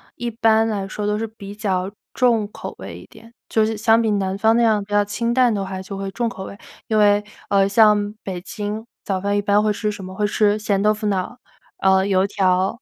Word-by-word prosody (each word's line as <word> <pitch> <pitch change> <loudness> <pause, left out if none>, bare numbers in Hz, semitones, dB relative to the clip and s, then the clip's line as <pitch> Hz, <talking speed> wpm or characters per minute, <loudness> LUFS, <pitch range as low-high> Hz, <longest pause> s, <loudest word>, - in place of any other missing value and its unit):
一 240 0 -3
般 225 -1 +3
来 205 -3 -2
说 205 +1 -4
都 210 0 0
是 225 - -2
比 205 -2 -10
较 190 -3 -1 0.2
重 230 -5 +2
口 - - -8
味 - - -8
一 - - -14
点， 230 +1 -17
就 220 -1 +2
是 220 0 -2
相 225 +1 +4
比 220 -2 +1
南 195 -2 -1
方 220 +2 +3
那 - - +3
样 215 -3 +2
比 205 - -17
较 205 0 +3
清 235 +3 -2
淡 250 -2 +3
的 200 -2 -2
话 190 0 -5
就 195 +1 -7
会 195 0 -4
重 235 +4 -1
口 230 -5 -6
味。 200 - -9 0.3
因 220 - +1
为， 205 -1 +4 0.3
呃， 195 -1 +3
像 210 -1 +4
北 185 -2 -5
京， 210 +3 -5 0.2
早 190 -2 -1
饭 200 +1 0
一 - - +1
般 205 +1 +2
会 215 - +2
吃 210 +1 -2
什 200 - -9
么？ 185 0 -8
会 210 +2 0
吃 210 0 +2
咸 205 -2 0
豆 210 0 +4
腐 215 0 -4
脑 190 -3 +1
儿， 245 - -11 0.5
呃， 190 0 +4
油 190 -1 +2
条， 185 -2 +2
205 Hz, 260 characters per minute, -21 LUFS, 195-220 Hz, 0.5 s, 相